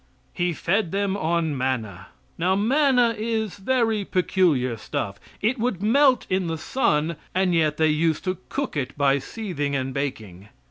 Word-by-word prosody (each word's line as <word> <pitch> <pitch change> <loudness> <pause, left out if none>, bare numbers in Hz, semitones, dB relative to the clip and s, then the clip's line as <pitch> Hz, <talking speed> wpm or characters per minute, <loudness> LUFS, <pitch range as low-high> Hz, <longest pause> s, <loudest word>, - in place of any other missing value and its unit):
He 175 -1 0
fed 175 +3 0
them 200 0 0
on 165 -4 0
manna. 115 -8 -3 0.3
Now 180 +3 +1
manna 250 +2 +3
is 220 -2 -2
very 225 -1 +1
peculiar 175 -10 +1
stuff. 100 -2 -4 0.2
It 240 +4 +1
would 220 -5 -1
melt 260 +3 +4
in 185 -1 0
the 165 -1 -2
sun, 155 - 0 0.2
and 185 -1 +2
yet 155 -2 +2
they 160 0 +3
used 155 +1 +1
to 185 -1 -2
cook 280 - -3
it 140 -2 -3
by 140 -1 +3
seething 145 - -4
and 130 -1 -2
baking. 110 -9 -5
175 Hz, 155 wpm, -24 LUFS, 140-215 Hz, 0.3 s, melt